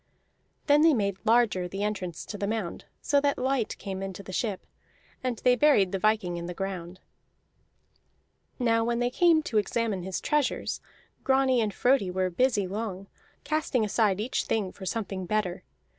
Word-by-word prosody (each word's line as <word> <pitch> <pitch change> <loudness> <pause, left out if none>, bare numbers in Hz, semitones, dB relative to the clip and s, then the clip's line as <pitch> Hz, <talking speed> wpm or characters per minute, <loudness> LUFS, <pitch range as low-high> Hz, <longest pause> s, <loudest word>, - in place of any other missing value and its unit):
Then 290 0 +5
they 320 -2 +6
made 200 -4 0
larger 225 -5 +3
the 195 +3 -4
entrance 190 -5 -3
to - - -7
the 200 0 -2
mound 210 -5 -3 0.2
so 285 -1 +3
that 285 0 +1
light 260 -3 -1
came 190 -1 -5
into 195 0 -6
the 190 - -9
ship; 205 -1 -2 0.6
and 250 -2 -1
they 250 0 +5
buried 225 -8 +4
the 195 - -1
viking 215 -4 +1
in 170 0 -5
the 180 - -6
ground. 185 -2 -5 1.6
Now 230 -3 +2
when 235 +1 0
they 245 +1 0
came 330 +1 +4
to 220 -7 +1
examine 210 -2 -1
his 190 +1 -3
treasures, 295 -3 -1 0.4
Grani 265 -2 +3
and 215 -2 0
Frodi 245 -3 +2
were 185 0 -1
busy 220 0 +2
long, 195 -1 -5 0.3
casting 305 -7 0
aside 210 -2 +1
each 230 +5 -1
thing 205 -4 -1
for 190 - -9
something 195 -4 -3
better. 210 -4 -1
215 Hz, 170 wpm, -27 LUFS, 190-245 Hz, 1.6 s, they